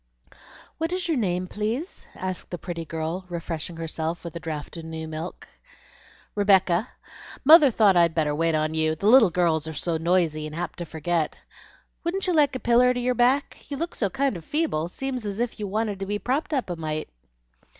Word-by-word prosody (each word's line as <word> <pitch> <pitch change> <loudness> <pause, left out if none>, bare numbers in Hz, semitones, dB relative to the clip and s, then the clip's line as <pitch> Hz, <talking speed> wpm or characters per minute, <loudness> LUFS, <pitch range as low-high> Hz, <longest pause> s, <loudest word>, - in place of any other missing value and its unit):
"What 325 +1 -1
is 365 -1 -2
your 325 -4 +1
name, 185 -5 0
please?" 220 - -4
asked 185 -2 -4
the 175 - -4
pretty 170 -1 -5
girl, 160 +3 -3
refreshing 165 -1 -5
herself 165 +1 -3
with 170 -2 -7
a - - -3
draught 155 -2 -6
of 165 - -7
new 160 0 -5
milk. 160 +2 -6 0.9
"Rebecca. 195 0 +3 0.6
Mother 305 -1 +9
thought 215 -5 +4
I'd 170 -2 +4
better 150 -3 +1
wait 165 +1 +1
on 155 0 0
you; 160 0 +1
the 180 - -6
little 225 -1 +7
girls 160 -2 +1
are 160 - -5
so 165 +3 -1
noisy 165 -2 +1
and 155 - -8
apt 175 0 -4
to 175 - -3
forget. 160 0 -2 0.6
Wouldn't 365 +3 -1
you 365 - +1
like 295 -4 +3
a - - -2
piller 250 +1 +4
to - - -1
your 250 +1 +1
back? 250 +4 +1
you 285 - -4
look 335 +4 -3
so 200 - -1
kind 270 +4 0
of 170 - -7
feeble 175 - -1
seems 260 +4 -4
as 205 0 -4
if 240 -1 -2
you 210 - -3
wanted 210 0 -1
to 195 - -4
be 205 +1 -1
propped 270 +9 -1
up 260 -10 -1
a - - -2
mite." 155 -1 -4
180 Hz, 200 wpm, -25 LUFS, 160-245 Hz, 0.9 s, Mother